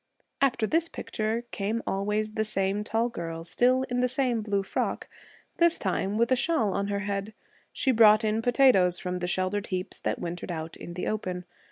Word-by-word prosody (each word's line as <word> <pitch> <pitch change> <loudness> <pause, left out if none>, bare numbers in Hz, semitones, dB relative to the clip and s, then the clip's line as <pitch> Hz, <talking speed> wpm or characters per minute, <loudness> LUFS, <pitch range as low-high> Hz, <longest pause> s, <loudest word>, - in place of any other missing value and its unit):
After 245 -5 +2
this 330 +7 +1
picture, 220 +2 -3
came 215 +3 -2
always 210 +2 -1
the 220 0 -1
same 200 -1 -1
tall 225 +2 0
girl 165 -7 -5
still 250 +9 +2
in 245 -1 -2
the 250 - +3
same 250 -3 0
blue 200 -2 0
frock, - - -2 0.5
this 340 -1 +4
time 195 +1 -1
with 235 +2 +2
a - - +6
shawl 245 - +1
on 200 0 -1
her 200 0 -1
head. 205 +1 -3 0.4
She 265 - +1
brought 220 -2 +6
in 215 +1 +1
potatoes 235 -8 +4
from 180 0 -3
the 180 - -2
sheltered 185 +3 -1
heaps 185 -1 -4
that - - -1
wintered 175 +1 -5
out 160 -1 -5
in 175 - -9
the 180 - -3
open. 185 -4 -3
210 Hz, 190 wpm, -27 LUFS, 190-235 Hz, 0.5 s, a